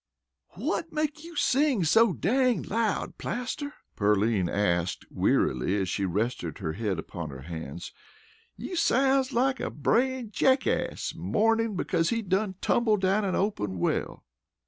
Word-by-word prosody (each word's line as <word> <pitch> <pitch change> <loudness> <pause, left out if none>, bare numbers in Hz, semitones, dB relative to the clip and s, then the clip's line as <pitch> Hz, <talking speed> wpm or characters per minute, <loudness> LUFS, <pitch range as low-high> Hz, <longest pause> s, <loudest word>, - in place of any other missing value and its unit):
"Whut 330 - -2
makes 305 0 -2
you 340 0 -10
sing 275 - +2
so 220 +7 +5
dang 250 - +1
loud, 220 -2 -1
Plaster?" 260 +4 -4 0.2
Pearline 105 -2 +2
asked 90 -3 0
wearily, 80 +11 +1
as 95 -2 -1
she 100 +3 -1
rested 110 +7 -2
her 80 -6 -3
head 100 -1 -2
upon 80 0 -6
her 65 -2 -9
hands. 80 +1 -7 0.6
"You 365 - -5
sounds 270 -4 +3
like 260 +2 +1
a - - -2
brayin' 240 - 0
jackace 260 +6 +1
mournin' 225 0 +1
because 170 -2 0
he 230 -1 -1
done 190 +1 0
tumbled 215 -4 +2
down 195 +2 +2
a 190 - 0
open 105 - -1
well." - - -2
200 Hz, 140 wpm, -27 LUFS, -, 0.6 s, so